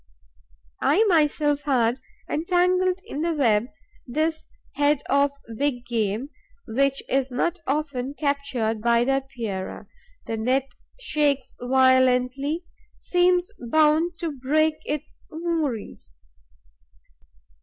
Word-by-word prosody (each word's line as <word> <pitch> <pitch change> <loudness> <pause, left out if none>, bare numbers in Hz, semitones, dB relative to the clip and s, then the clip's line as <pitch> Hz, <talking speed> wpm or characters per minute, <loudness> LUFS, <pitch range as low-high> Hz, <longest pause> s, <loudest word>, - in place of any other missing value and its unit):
I 435 - +4
myself 300 -6 +2
had 250 -3 +2 0.3
entangled 365 +3 +1
in 300 -8 -5
the 335 0 0
web 230 -5 +2 0.4
this 315 +5 -1 0.3
head 290 0 +2
of 280 +1 +3 0.2
big 260 -2 -1
game, 225 +3 -2 0.4
which 275 +3 +1
is 270 0 0
not 340 +8 -1
often 280 -2 -2
captured 280 -7 -1
by 235 +1 +3
the 270 +2 +2
Epeirae. 225 -8 -6 0.4
The 225 - -3
net 260 +4 0 0.3
shakes 295 - 0
violently, 260 +4 +2 0.3
seems 360 0 +2
bound 310 +7 +3
to 335 -2 -1
break 305 +3 +1
its 300 0 -5
moorings. 305 - -4
280 Hz, 100 wpm, -24 LUFS, 250-315 Hz, 0.4 s, I